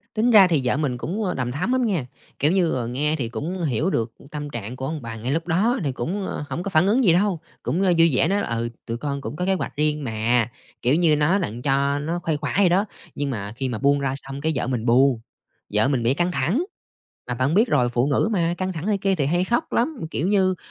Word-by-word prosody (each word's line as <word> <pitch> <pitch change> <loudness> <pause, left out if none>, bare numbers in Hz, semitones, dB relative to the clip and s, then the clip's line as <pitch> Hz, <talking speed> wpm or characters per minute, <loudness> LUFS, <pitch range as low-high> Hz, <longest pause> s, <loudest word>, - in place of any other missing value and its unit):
Tính 230 +3 +3
ra 205 -4 +8
thì 160 -5 +2
vợ 125 - +1
mình 140 -5 -1
cũng, 190 - -3
ờ, 180 -3 -1
đằm 125 -2 -2
thắm 170 - -2
lắm 255 -1 +2
nha, 185 - 0 0.3
kiểu 150 +3 +3
như, 180 -3 +2
ờ, 125 -3 -2
nghe 145 +6 0
thì 130 -7 -3
cũng 165 +10 -4
hiểu 150 +3 0
được 115 -10 -1 0.2
tâm 150 -1 -5
trạng 120 -2 -6
của 130 +1 -5
ông 155 +2 -4
bà 115 -2 -6
ngay 115 +4 -3
lúc 165 +3 -1
đó 215 +10 +2
thì 140 - 0
cũng 180 +11 -3 0.2
hổng 175 - -3
có 200 - -3
phản 175 0 +3
ứng 240 +6 +3
gì 180 -7 +5
đâu, 185 -1 +2 0.2
cũng 175 - -1
vui 170 -3 +4
vẻ 145 - +3
nói 200 +3 +1
là - - -3
"Ừ, 115 0 -2 0.2
tụi 115 - -3
con 140 +1 -3
cũng 140 - -6
có 180 - -2
kế 195 - +2
hoạch 190 - -3
riêng 150 0 0
mà." 115 0 +1 0.3
Kiểu 125 +4 +3
như 165 -2 +4
nói 150 +7 +2
đặng 120 - -4
cho 140 +1 +1
nó 165 +4 -2
khuây 160 -3 -1
khỏa 145 -1 -3
vậy 200 -3 +5
đó, 190 +4 +3 0.3
nhưng 145 -1 -2
mà 105 -5 -4
khi 130 +1 -2
mà 120 - -3
buông 140 +4 +2
ra 135 -1 -1
xong 135 0 -6
cái 160 +2 +1
vợ 125 - -1
mình 125 -3 -2
buồn, 125 +1 +4 0.5
vợ 105 +4 +3
mình 135 -4 0
bị 120 +3 +3
căng 175 +4 0
thẳng. 175 - 0 0.6
Mà 125 - -2
bạn 130 +5 0
biết 215 +7 +4
rồi, 125 - +2
phụ 120 +2 +1
nữ 145 +9 +2
mà, 170 -3 +1
căng 185 0 -2
thẳng 165 0 -5
này 210 -1 +1
kia 195 0 +1
thì 145 -6 0
hay 175 +5 +1
khóc 240 - -1
lắm, 285 +5 +1
kiểu 165 - -1
như 190 -2 +3
150 Hz, 265 wpm, -23 LUFS, 130-185 Hz, 0.6 s, ra